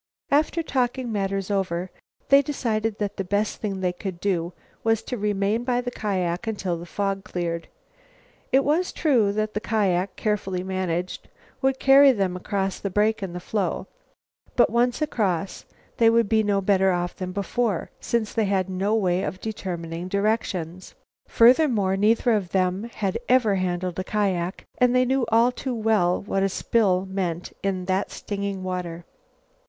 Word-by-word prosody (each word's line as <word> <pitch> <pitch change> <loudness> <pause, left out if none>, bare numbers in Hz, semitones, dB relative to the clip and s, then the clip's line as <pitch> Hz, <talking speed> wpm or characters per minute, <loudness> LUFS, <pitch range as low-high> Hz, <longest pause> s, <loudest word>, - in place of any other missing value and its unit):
After 310 +3 +2
talking 255 -3 -1
matters 195 -1 -2
over 185 -2 -1 0.4
they 275 0 +7
decided 225 -6 -2
that 205 -2 -3
the 195 - -1
best 205 +3 -1
thing 195 -3 -3
they 180 -1 0
could 180 -1 -6
do 175 -3 -1 0.3
was 225 -1 +2
to 250 - -4
remain 205 +1 0
by 245 -1 +1
the 245 0 -3
kiak 185 -2 -2
until 200 -5 -2
the 170 +1 -8
fog 195 0 -2
cleared. 170 -1 -3 0.8
It 270 +1 +4
was 320 +6 +1
true 245 - +2
that 215 0 -1
the 210 - -1
kiak, 195 -4 0
carefully 195 -4 -1
managed, 185 -2 -3 0.3
would 265 -1 +2
carry 275 +1 +7
them 195 -5 -1
across 195 +1 -2
the 200 - -3
break 210 +3 +1
in 190 -3 -4
the 180 - -4
floe, 195 +1 -2 0.7
but, 240 - +4
once 240 +5 +2
across, 195 - -1 0.3
they 230 -1 +6
would 230 -1 +3
be 220 +1 +3
no 205 -2 +1
better 190 -1 +3
off 175 0 -2
than 185 -1 -5
before, 200 0 -1
since 230 -3 -1
they 225 -2 +1
had 190 -1 0
no 195 +4 0
way 185 -4 +1
of 185 - -4
determining 175 -5 -5
directions. 190 -4 -2 0.3
Furthermore, 230 -6 +4
neither 225 +4 +3
of 205 -5 0
them 185 +2 0
had 195 -4 -2
ever 245 -5 +4
handled 180 -1 -2
a - - -1
kiak 190 -3 -1 0.2
and 250 0 +4
they 255 0 +4
knew 260 -1 +1
all 230 +2 +5
too 250 0 -4
well 215 -6 +2
what 195 -1 -1
a 195 - +2
spill 190 -2 +1
meant 185 -3 -3
in 190 -2 -2
that 190 +1 0
stinging 200 -2 -4
water. 175 -2 -4
200 Hz, 165 wpm, -24 LUFS, 185-225 Hz, 0.8 s, they